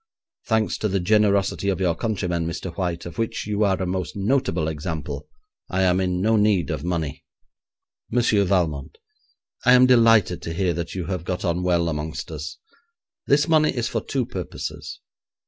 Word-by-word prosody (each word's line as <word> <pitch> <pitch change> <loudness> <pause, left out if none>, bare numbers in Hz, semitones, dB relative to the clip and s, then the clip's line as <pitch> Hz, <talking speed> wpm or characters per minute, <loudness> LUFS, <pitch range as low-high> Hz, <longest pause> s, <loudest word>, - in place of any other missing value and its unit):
Thanks 110 -2 +1
to 110 - 0
the 100 0 0
generosity 100 0 +2
of 95 - -1
your 90 -3 +2
countrymen, 90 -4 -2
Mr 85 +1 -5
White, 85 -2 -2
of 85 +2 -8
which 115 - -2
you 105 0 0
are 95 -2 +2
a 95 - -1
most 90 0 -3
notable 100 - 0
example, 80 0 -4 0.4
I 95 0 +1
am 90 0 +3
in 90 -1 0
no 110 +4 +3
need 105 -5 +2
of 75 -2 -3
money.' 80 -5 -3 0.9
'Monsieur 115 -4 +3
Valmont, 85 -8 -1 0.7
I 125 - +6
am 125 0 +7
delighted 115 -8 +4
to 85 - -5
hear 90 -1 +1
that 85 +1 -5
you 90 -2 -3
have 90 -4 -3
got 90 +2 -3
on 85 0 0
well 85 -2 +1
amongst 80 +1 -4
us. 75 0 -6 0.7
This 145 +3 +3
money 155 -2 +4
is 120 -2 -1
for - - -2
two 130 -3 -2
purposes. 95 -8 -6
95 Hz, 175 wpm, -23 LUFS, 85-105 Hz, 0.9 s, am